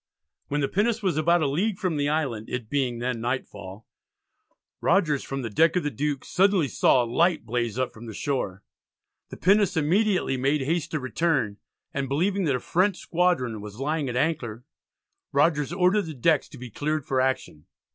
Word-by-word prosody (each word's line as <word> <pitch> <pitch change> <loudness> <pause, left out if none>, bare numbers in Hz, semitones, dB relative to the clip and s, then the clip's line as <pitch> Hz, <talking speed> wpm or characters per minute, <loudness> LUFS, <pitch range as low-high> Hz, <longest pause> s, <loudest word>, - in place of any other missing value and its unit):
When 145 +1 -1
the 140 - +1
pinnace 220 +5 0
was 185 -5 +1
about 165 +2 +3
a - - +2
league 185 +9 0
from 185 -6 -1
the 145 0 0
island, 135 -8 -2
it 125 -3 -5
being 130 -4 0
then 120 -1 -2
nightfall, 115 -4 -5 1.0
Rogers, 165 -6 +2
from 135 -1 -4
the 115 - -3
deck 160 - +3
of 180 - +1
the 150 - -1
Duke, 145 -1 -2
suddenly 190 -4 +3
saw 125 0 +3
a - - -2
light 160 +4 +1
blaze 120 0 -2
up 130 -1 -1
from 115 +1 -11
the 110 - -7
shore. 100 -9 -3 0.7
The - - -9
pinnace 195 -1 +3
immediately 180 -1 +2
made 135 +3 +1
haste 160 +4 -1
to 155 - -2
return, 130 -6 0 0.4
and 135 -1 -2
believing 185 +7 +1
that 140 -4 +2
a - - -1
French 185 +7 +1
squadron 165 - 0
was 105 +2 -9
lying 150 0 -1
at 120 - -4
anchor, 125 -6 -1 0.7
Rogers 150 0 +2
ordered 180 +2 +2
the 155 - -6
decks 155 +5 +2
to 145 - -12
be 125 -2 -9
cleared 150 +4 -2
for 130 -1 +1
action. 110 - -2
145 Hz, 185 wpm, -25 LUFS, 125-170 Hz, 1.0 s, about